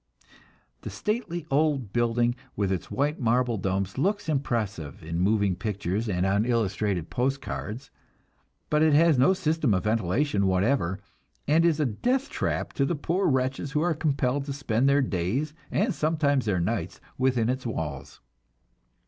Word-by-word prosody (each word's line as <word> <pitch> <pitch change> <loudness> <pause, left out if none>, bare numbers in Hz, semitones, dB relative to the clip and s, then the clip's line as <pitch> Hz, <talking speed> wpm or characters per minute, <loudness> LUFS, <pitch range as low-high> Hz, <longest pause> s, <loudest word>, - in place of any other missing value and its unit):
The - - -6
stately 180 -7 -3
old 140 -7 +1
building 120 0 +2 0.2
with 100 -2 0
its 95 - -3
white 145 +3 -1
marble 120 -1 +1
domes 95 +3 -2
looks 200 +6 0
impressive 110 - -2
in 85 +1 -3
moving 100 0 +2
pictures 105 +1 -2
and 90 -1 0
on 100 +2 +2
illustrated 105 -6 -1
postcards, 130 -2 -3 0.8
but 150 0 +3
it 155 -2 +5
has 160 -3 +5
no 160 +9 +5
system 155 - +1
of 90 - -1
ventilation 105 +1 +1
whatever, 95 0 +1 0.5
and 160 +3 +4
is 165 -3 +3
a 150 - +2
death 250 - -1
trap - - -2
to 140 - +1
the 170 - 0
poor 175 +6 0
wretches 130 0 0
who 150 - +2
are 175 0 +2
compelled 140 -3 0
to 140 - -4
spend 135 -2 +1
their 140 0 +4
days, 120 - -1 0.2
and 215 +3 +1
sometimes 150 -4 +1
their 100 -4 +1
nights, 85 - -2 0.2
within 130 -3 +2
its 130 0 -2
walls. 75 - -5
125 Hz, 155 wpm, -26 LUFS, 100-150 Hz, 0.8 s, it